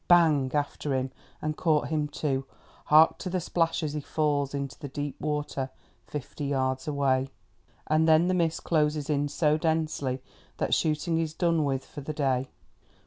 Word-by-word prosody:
Bang! 160 -6 +5
after 145 -1 -1
him, 130 0 -1 0.3
and 155 0 -1
caught 155 -3 +1
him 155 -2 0
too! 140 -2 -1 0.4
Hark 155 +2 +6
to 185 - -4
the 185 +1 0
splash 165 0 0
as 150 -2 -2
he 150 - -2
falls 145 -2 0
into 140 -1 -4
the 145 - -5
deep 145 0 -5
water 150 -3 -2 0.4
fifty 145 0 -5
yards 130 -1 -1
away. 135 -2 +1 0.6
And 155 +1 +3
then 160 +2 +5
the 185 - +2
mist 165 -3 0
closes 150 -2 +1
in 145 0 +1
so 150 +1 +2
densely 155 -5 -1 0.3
that - - 0
shooting 160 +1 +1
is 160 -1 -2
done 165 -3 +2
with 135 -1 -1
for 145 - -9
the 155 +3 -4
day. 135 -3 0
150 Hz, 170 wpm, -28 LUFS, 140-160 Hz, 0.6 s, Hark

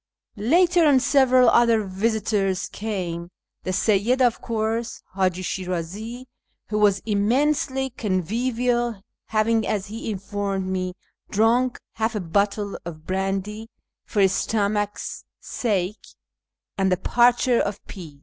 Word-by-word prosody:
Later 340 - +3
on 275 -3 +5
several 255 -1 +4
other 230 -2 +4
visitors 195 -1 0
came; 180 -5 -4 0.3
the - - -5
Seyyid, 215 +6 +2
of 245 -3 +2
course; 225 +1 -2
Haji 185 -1 0
Shirazi, 190 +7 -4 0.4
who 210 0 0
was 200 -2 +3
immensely 265 +5 +1
convivial, 235 +3 -1 0.3
having, 220 0 +1
as 200 -3 -1
he 225 +2 -5
informed 200 -1 -3
me, 185 -1 -2 0.3
drunk 235 +4 +2 0.2
half 220 +1 0
a - - 0
bottle 200 +3 -1
of 160 -2 -9
brandy 195 +4 -2 0.2
" - - -64
for 210 - 0
his 190 -1 +4
stomach's 205 -1 -1 0.2
sake 205 -4 -2 0.4
"; - - -63
and 190 -1 +2
the 185 - +3
parcher 240 +4 +3
of 205 0 -1
peas. 160 -7 -10
210 Hz, 125 wpm, -23 LUFS, 190-235 Hz, 0.4 s, on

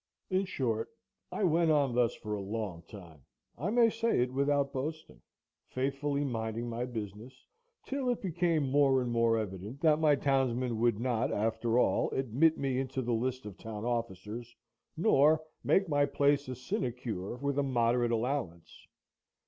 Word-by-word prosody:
In 190 +1 +2
short, 115 - -2 0.4
I - - -2
went 170 -2 +3
on 145 -5 +3
thus 120 -1 +2
for 105 - -6
a 105 - -3
long 100 -4 -4
time, 85 -8 -12 0.3
I 155 +11 -3
may 230 0 +4
say 230 - +1
it 125 +1 -1
without 140 0 +1
boasting, 155 +4 -5 0.5
faithfully 140 +2 -1
minding 115 -2 -3
my 120 +1 -3
business, 115 +1 -8 0.4
till 270 -2 -2
it 245 - 0
became 170 -5 0
more 135 -2 +4
and 120 - -3
more 115 -1 +3
evident 105 +4 -5
that 155 -2 +4
my 155 -2 +4
townsmen 130 -4 0
would 115 -2 +2
not 120 -1 0
after 115 +2 0
all - - +2
admit 135 +5 +2
me 135 -2 -1
into 130 0 -3
the 120 0 -1
list 130 +2 -2
of 105 -3 -9
town 110 -1 -6
officers, 115 0 -4 0.4
nor 155 -4 +4 0.2
make 195 0 +3
my 145 -2 +2
place 140 0 +2
a 130 - -4
sinecure 120 -5 -3
with 140 +2 -1
a - - +2
moderate 120 -2 +2
allowance. 115 - -3
130 Hz, 160 wpm, -31 LUFS, 115-145 Hz, 0.5 s, may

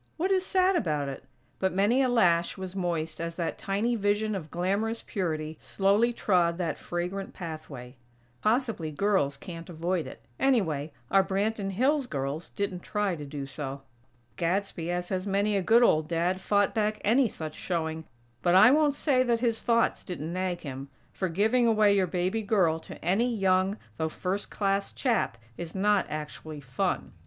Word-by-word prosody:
What 365 +4 0
is 375 -1 +3
sad 375 0 +3
about 150 - 0
it? 135 - -8 0.3
But 190 0 +1
many 210 +7 +3
a 260 - +2
lash 175 -8 +3
was 190 0 -6
moist 165 -4 -2
as 170 0 -4
that 170 -1 -3
tiny 210 +5 0
vision 210 0 +1
of 170 -6 -5
glamorous 200 +7 -1
purity 160 -5 -3
slowly 205 +5 +2
trod 175 -7 +2
that 170 -5 -2
fragrant 180 +3 -4
pathway. 150 -7 -8 0.4
Possibly 225 - 0
girls 155 -4 +1
can't 170 0 -9
avoid 170 0 -2
it; - - -11 0.2
anyway, 165 - +1 0.2
our 195 0 +5
Branton 200 +1 -1
Hills 270 +6 +2
girls 140 - -3
didn't 200 -3 -3
try 205 0 -1
to 150 -2 -7
do 140 -1 -5
so. 135 0 -6 0.5
Gadsby, 175 -1 -1
as 175 0 -2
has 185 0 -2
many 200 +1 +1
a 195 - +2
good 230 +6 +5
old 155 -8 +3
Dad, 175 +3 0
fought 205 0 +2
back 215 -1 0
any 240 +5 +4
such 160 -6 -6
showing; 160 -2 -3 0.4
but 175 0 +3
I 215 +6 +8
won't 295 -1 +3
say 275 -3 +2
that 240 -2 +2
his 230 -2 +1
thoughts 230 -1 +2
didn't 170 -3 -5
nag 185 -1 -2
him; 135 -1 -7 0.2
for, 185 - -2
giving 220 +8 +2
away 215 -2 +4
your 190 -2 +2
baby 185 +5 -1
girl 185 -7 +2
to - - -10
any 220 +8 +2
young, 190 0 +2 0.2
though 160 0 -1
first 190 +5 -3
class 195 -1 -1
chap, 235 - 0 0.2
is 170 0 -6
not 205 0 +2
actually 155 0 -6
fun. 125 -3 -2
190 Hz, 170 wpm, -28 LUFS, 165-215 Hz, 0.5 s, I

